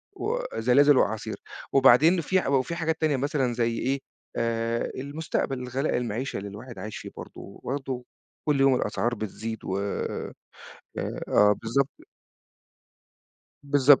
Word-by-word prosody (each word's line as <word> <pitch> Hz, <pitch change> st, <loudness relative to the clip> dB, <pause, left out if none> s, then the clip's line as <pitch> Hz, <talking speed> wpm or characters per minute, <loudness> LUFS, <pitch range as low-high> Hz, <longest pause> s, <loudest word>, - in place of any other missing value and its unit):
وزلازل 145 Hz, -, +3 dB
وأعاصير. 110 Hz, -2 st, 0 dB, 0.4 s
وبعدين 140 Hz, +7 st, +6 dB
في 185 Hz, +3 st, +2 dB
ح -, -, -4 dB
و 140 Hz, -, +1 dB
وفي 170 Hz, +6 st, -3 dB
حاجات 165 Hz, -1 st, -1 dB
تانية 150 Hz, -4 st, +2 dB
مثلًا 135 Hz, -3 st, 0 dB
زي 115 Hz, -1 st, 0 dB
إيه، 135 Hz, +2 st, 0 dB, 0.4 s
آآ 115 Hz, 0 st, 0 dB
المستقبل، 140 Hz, -1 st, -2 dB
الغلاء، 125 Hz, +4 st, -1 dB
المعيشة 120 Hz, +2 st, -2 dB
اللي 100 Hz, +1 st, -5 dB
الواحد 115 Hz, +5 st, -9 dB
عايش 110 Hz, 0 st, -6 dB
فيه -, -, -7 dB
برضه، -, -, -8 dB
وبرضه 130 Hz, -2 st, -5 dB, 0.4 s
كل 145 Hz, -2 st, +3 dB
يوم 135 Hz, -1 st, +6 dB
الأسعار 120 Hz, +1 st, 0 dB
بتزيد 110 Hz, +1 st, -5 dB
و 95 Hz, -, -1 dB
آآ 100 Hz, 0 st, -3 dB, 1.0 s
آه 105 Hz, 0 st, +6 dB
بالضبط. 135 Hz, +5 st, +1 dB, 1.7 s
بالضب 145 Hz, -1 st, +6 dB
130 Hz, 135 wpm, -27 LUFS, 115-145 Hz, 1.7 s, وبعدين